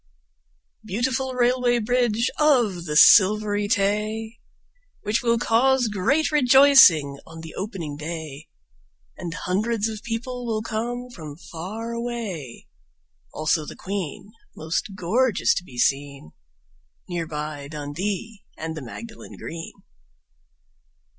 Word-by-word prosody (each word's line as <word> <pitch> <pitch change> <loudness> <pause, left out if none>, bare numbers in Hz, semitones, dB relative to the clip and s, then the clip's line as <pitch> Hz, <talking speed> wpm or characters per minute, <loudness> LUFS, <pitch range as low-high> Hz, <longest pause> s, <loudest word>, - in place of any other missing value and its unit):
Beautiful 255 +5 -1
Railway 245 0 +2
Bridge 235 0 +1
of 240 - +3
the 150 -2 -3
Silvery 205 +4 +6
Tay! 215 +2 -1 0.6
Which 210 +2 0
will 235 -1 +2
cause 245 +1 +3
great 275 - +1
rejoicing 260 - +6
on 165 0 -10
the 160 -1 -9
opening 180 -8 -5
day 155 -1 -7 0.7
And 170 - -6
hundreds 215 +4 -1
of 220 -1 -6
people 245 +2 -4
will 215 -1 -1
come 240 +3 -4
from 155 -9 -9
far 190 +8 -7
away, 230 - -5 0.7
Also 155 +1 0
the - - -9
Queen, 195 0 -5 0.2
most 165 +5 -3
gorgeous 220 +5 +2
to - - -3
be 130 -9 -13
seen, 140 - -1 0.8
Near 175 -2 -3
by 150 -2 -5
Dundee 180 +9 -5
and 160 0 -5
the 155 - -6
Magdalen 220 - -10
Green. 165 0 -7
210 Hz, 115 wpm, -24 LUFS, 160-235 Hz, 0.8 s, Silvery